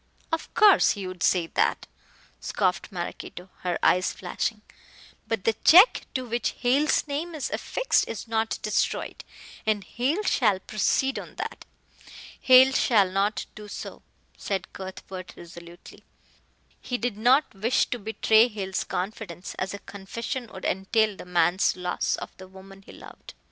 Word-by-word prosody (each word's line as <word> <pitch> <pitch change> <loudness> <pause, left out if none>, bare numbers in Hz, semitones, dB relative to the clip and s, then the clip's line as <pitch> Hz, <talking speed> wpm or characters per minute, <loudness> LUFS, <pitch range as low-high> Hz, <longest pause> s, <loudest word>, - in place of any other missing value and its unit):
"Of 325 - -3
course 420 -3 +6
he 200 -3 -6
would 185 -1 -8
say 180 -2 +3
that," - - 0 0.5
scoffed 185 0 -1
Maraquito, 180 0 -7
her 180 -1 -2
eyes 180 +1 +3
flashing, 210 +3 -4 0.6
"but 225 -4 -2
the 225 - +2
check 370 +9 +7
to 255 -1 -2
which 235 -1 -2
Hale's 275 +6 +2
name 315 +4 -4
is 295 - -4
affixed - - 0
is 230 - -6
not 225 0 -1
destroyed, 215 - -1 0.4
and 215 -2 0
Hale 280 - -1
shall 210 - +2
proceed 265 +7 0
on - - -11
that." - - -6 0.8
"Hale 260 +1 +7
shall 205 -8 +3
not 200 +2 0
do 210 -1 -10
so," - - -8 0.4
said 190 -2 -4
Cuthbert 190 -1 -8
resolutely. 170 0 -13 0.8
He 250 - -3
did 245 -3 -2
not 250 +7 +3
wish 220 +6 +1
to 245 - -2
betray 220 +1 +3
Hale's 195 -5 -3
confidence, 185 -1 -5
as 190 +2 -3
a 200 - -13
confession 230 +5 -6
would 190 - -9
entail 205 +3 +1
the - - -10
man's 175 +1 +2
loss 180 -1 -1
of - - -9
the 185 - -11
woman 195 +1 -14
he - - -14
loved. - - -13
210 Hz, 150 wpm, -26 LUFS, 190-245 Hz, 0.8 s, check